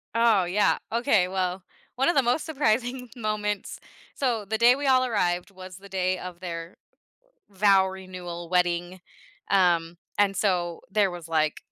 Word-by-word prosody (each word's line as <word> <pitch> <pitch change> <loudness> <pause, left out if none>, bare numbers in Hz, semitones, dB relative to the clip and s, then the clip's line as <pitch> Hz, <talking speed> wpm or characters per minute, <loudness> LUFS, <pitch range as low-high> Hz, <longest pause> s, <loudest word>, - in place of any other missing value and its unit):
Oh, 230 -5 +4
yeah, 190 +4 +2
okay. 225 -6 +2
Well, 185 0 -2 0.3
one 270 +5 +2
of 345 - +1
the 275 - +5
most 250 +6 0
surprising 250 -4 -1
moments 210 -3 -3 0.4
so, 235 -6 -1
the 220 +2 -2
day 240 +2 +6
we 285 +1 -4
all 255 -1 +4
arrived 180 -5 0
was 185 -1 -11
the 200 0 -14
day 185 -1 -1
of 180 -1 -8
their 170 -1 -6 0.7
vow 195 -1 +4
renewal 180 -3 -8
wedding, 175 0 0 0.5
um, 175 -3 +2 0.2
and 200 -1 +3
so, 175 -4 0
there 205 -2 +3
was, 175 -2 -8
like, 155 -1 0
190 Hz, 155 wpm, -26 LUFS, 180-225 Hz, 0.7 s, day